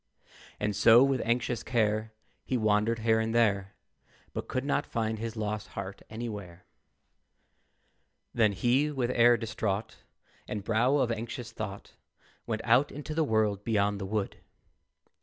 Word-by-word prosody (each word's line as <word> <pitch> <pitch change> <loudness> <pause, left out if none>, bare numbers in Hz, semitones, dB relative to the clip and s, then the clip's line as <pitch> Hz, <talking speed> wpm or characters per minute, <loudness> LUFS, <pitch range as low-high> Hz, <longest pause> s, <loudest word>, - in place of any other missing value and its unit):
And 105 -1 -1
so, 115 +5 +7
with 135 -2 +1
anxious 120 0 0
care, 110 -2 0 0.3
He 130 - -1
wandered 110 +1 +2
here 110 0 +3
and 110 +1 -1
there, 100 -4 +2 0.6
But - - -4
could 130 +1 -2
not 145 - +1
find 110 -1 -2
his 115 0 -4
lost 105 -1 -3
heart 95 +1 -5
anywhere. 105 -6 -7 1.7
Then 110 -4 +3
he, 125 +9 +2
with 130 -4 -1
air 120 0 +5
distraught, 110 -2 -3 0.5
And 105 -2 -4
brow 115 +6 +2
of 125 -4 +1
anxious 115 +1 -5
thought, 105 -3 -7 0.5
Went - - -2
out 140 +2 +4
into 150 +2 -6
the 160 +1 +2
world 110 -6 +1
beyond 105 -2 +1
the 95 - -4
wood. 105 -1 -2
110 Hz, 140 wpm, -29 LUFS, 105-120 Hz, 1.7 s, so